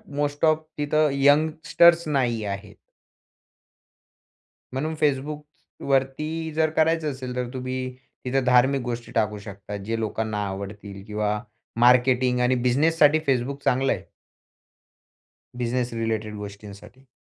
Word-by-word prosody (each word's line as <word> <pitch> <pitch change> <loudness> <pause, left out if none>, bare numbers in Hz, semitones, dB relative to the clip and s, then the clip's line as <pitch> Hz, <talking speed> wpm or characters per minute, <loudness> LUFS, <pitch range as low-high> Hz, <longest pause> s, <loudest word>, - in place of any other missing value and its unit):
Most 145 +1 0
of 155 0 +3
तिथं 150 +1 +2
youngsters 160 +4 +4
नाही 125 -6 0
आहेत. 100 -1 -6 2.0
म्हणून 150 +5 -2
Facebookवरती 150 +1 -2
जर 160 0 +2
करायचं 160 -1 +2
असेल 130 -2 -6
तर 125 -1 -2
तुम्ही 130 0 -4 0.5
तिथं 135 +1 +1
धार्मिक 130 +2 +4
गोष्टी 120 -1 -5
टाकू 105 0 0
शकता. 100 0 -8
जे 110 +3 -3
लोकांना 110 -1 -2
आवडतील 100 0 -7
किंवा 105 0 -1 0.4
मार्केटिंग 125 0 +4
आणि 125 +1 +3
बिझनेससाठी 150 +4 +4
Facebook 135 +2 -1
चांगलं 130 +2 +2
आहे. - - -6 1.5
बिझनेस 125 0 -2
रिलेटेड 110 -2 -2
गोष्टींसाठी. 105 +5 -11
130 Hz, 110 wpm, -24 LUFS, 110-145 Hz, 2.0 s, youngsters